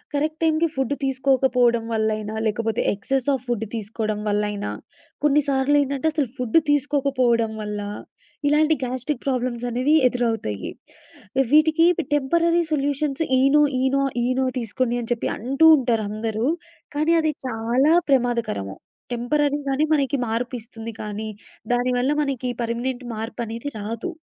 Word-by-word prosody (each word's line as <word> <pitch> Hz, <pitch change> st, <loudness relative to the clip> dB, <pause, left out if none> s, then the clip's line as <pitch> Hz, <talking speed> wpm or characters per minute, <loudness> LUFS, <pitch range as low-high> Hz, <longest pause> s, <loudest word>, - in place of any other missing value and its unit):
Correct 310 Hz, +2 st, -1 dB
టైమ్‌కి 320 Hz, +1 st, +3 dB
food 265 Hz, 0 st, 0 dB
తీసుకోకపోవడం 260 Hz, -3 st, +2 dB
వల్లయినా, 215 Hz, -1 st, -1 dB
లేకపోతే 225 Hz, +1 st, -1 dB
ఎక్సెస్ 260 Hz, +6 st, -2 dB
ఆఫ్ 260 Hz, -, -2 dB
ఫుడ్ 225 Hz, -2 st, -1 dB
తీసుకోవడం 215 Hz, 0 st, -3 dB
వల్లయినా, 205 Hz, 0 st, -1 dB, 0.5 s
కొన్నిసార్లు 285 Hz, -1 st, +3 dB
ఏంటంటే 280 Hz, +3 st, -1 dB
అసలు 290 Hz, -6 st, 0 dB
ఫుడ్ 250 Hz, +4 st, +2 dB
తీసుకోకపోవడం 260 Hz, -6 st, +1 dB
వల్ల 210 Hz, 0 st, -4 dB, 0.7 s
ఇలాంటి 305 Hz, +2 st, +4 dB
గ్యాస్ట్రిక్ 255 Hz, +3 st, -3 dB
ప్రాబ్లమ్స్ 250 Hz, -2 st, -1 dB
అనేవి 255 Hz, +6 st, +1 dB
ఎదురవుతాయి. 225 Hz, -, -2 dB, 0.8 s
వీటికి 315 Hz, +2 st, +5 dB, 0.3 s
temporary 335 Hz, +5 st, +2 dB
solutions 285 Hz, +1 st, 0 dB, 0.2 s
Eno, 275 Hz, +3 st, +5 dB, 0.2 s
Eno, 265 Hz, +1 st, +2 dB, 0.2 s
Eno 255 Hz, +1 st, +1 dB
తీసుకోండి 240 Hz, +1 st, -1 dB
అని 235 Hz, +1 st, -6 dB
చెప్పి 235 Hz, -, -3 dB
అంటూ 275 Hz, +8 st, +3 dB
ఉంటారు 235 Hz, -5 st, 0 dB
అందరూ. 220 Hz, +2 st, -2 dB, 0.5 s
కానీ 310 Hz, +3 st, +2 dB
అది 310 Hz, -1 st, +1 dB, 0.2 s
చాలా 245 Hz, +6 st, +2 dB, 0.2 s
ప్రమాదకరము. 235 Hz, -, 0 dB, 0.4 s
టెంపరరీ 285 Hz, +4 st, +1 dB
గానే 275 Hz, +3 st, +2 dB
మనకి 280 Hz, -1 st, +1 dB
మార్పు 235 Hz, +3 st, -2 dB
ఇస్తుంది. 225 Hz, 0 st, -9 dB
కానీ 215 Hz, +1 st, -5 dB, 0.4 s
దాని 245 Hz, +1 st, +1 dB
వల్ల 260 Hz, +4 st, +1 dB
మనకి 260 Hz, -3 st, -2 dB
పర్మనెంట్ 240 Hz, +2 st, -2 dB
మార్పనేది 230 Hz, +3 st, -5 dB
రాదు. 225 Hz, -, -4 dB
255 Hz, 125 wpm, -23 LUFS, 225-285 Hz, 0.8 s, వీటికి